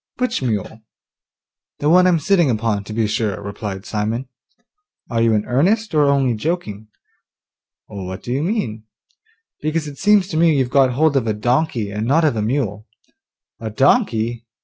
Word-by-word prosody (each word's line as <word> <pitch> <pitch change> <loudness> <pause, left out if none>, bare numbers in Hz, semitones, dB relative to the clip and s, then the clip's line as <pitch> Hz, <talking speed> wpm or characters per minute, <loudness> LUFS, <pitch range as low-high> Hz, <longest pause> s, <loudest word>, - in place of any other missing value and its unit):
'Which 250 - -1
mule?' 110 -2 -3 1.0
'The 145 - -2
one 180 +3 +5
I'm 175 -2 +4
sitting 170 -1 +2
upon, 110 -3 -1
to 110 - -9
be 110 +1 0
sure,' 105 -2 -1
replied 100 -1 -6
Simon. 115 +3 -2 0.8
'Are 115 -1 +1
you 115 -1 +3
in 105 - 0
earnest, 195 - +1
or 150 -1 +4
only 140 -3 +2
joking?' 110 - -4 1.0
'What 95 -2 -7
do 120 - -5
you 135 - 0
mean?' 135 - -2 0.8
'Because 155 0 -1
it 140 -1 -9
seems 205 -2 +4
to 155 - -3
me 165 -2 +4
you've 130 -2 0
got 130 -2 +4
hold 150 +2 +2
of 125 -4 +1
a 110 - +1
donkey, 120 -1 0
and 105 +2 -3
not 160 +5 +3
of 150 - +2
a 110 - -1
mule.' 110 -3 -2 0.7
'A 110 - -5
donkey? 120 - +1
120 Hz, 170 wpm, -19 LUFS, 110-155 Hz, 1.0 s, one